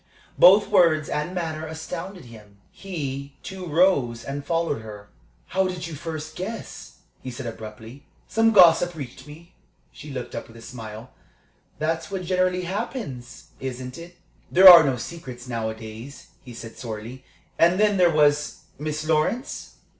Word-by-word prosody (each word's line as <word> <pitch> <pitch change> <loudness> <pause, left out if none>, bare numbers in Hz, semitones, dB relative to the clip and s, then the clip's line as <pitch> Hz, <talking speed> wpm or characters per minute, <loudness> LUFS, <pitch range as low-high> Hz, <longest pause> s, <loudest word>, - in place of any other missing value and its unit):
Both 195 +3 +7
words 155 -3 +4
and 150 +5 -3
manner 160 -3 -3
astounded 165 +3 -7
him. 105 -4 -15
He, 140 -7 -6
too, 190 -2 -7
rose 145 -9 +2
and 140 +1 -5
followed 165 -4 -1
her. 105 -2 -11 0.4
"How 190 0 +1
did 180 -1 -5
you 165 - -7
first 155 0 -6
guess?" 215 +5 -7 0.2
he 130 - -6
said, 125 +1 -7
abruptly. 110 +4 -9 0.2
"Some 225 0 +3
gossip 175 -3 +6
reached 130 -2 -9
me." 165 +4 -14 0.4
She 150 - -11
looked 130 -3 -6
up - - -6
with 115 - -15
a - - -12
smile. 115 -1 -9 0.7
"That's 160 +1 -2
what 190 -2 -4
generally 185 0 0
happens, 190 - -6
isn't 130 +1 -6
it?" 175 +1 -12 0.3
"There 190 +2 +8
are 175 -3 +12
no 135 -3 +1
secrets 125 -3 -8
nowadays," 110 +2 -6
he 125 -3 -11
said, 115 0 -10
sorely. 115 +3 -7 0.4
"And 175 +3 +4
then, 210 -1 +3
there 180 -2 +5
was 150 -2 +2 0.2
Miss 155 +1 -4
Lawrence?" 160 - -1
155 Hz, 150 wpm, -24 LUFS, 125-175 Hz, 0.7 s, are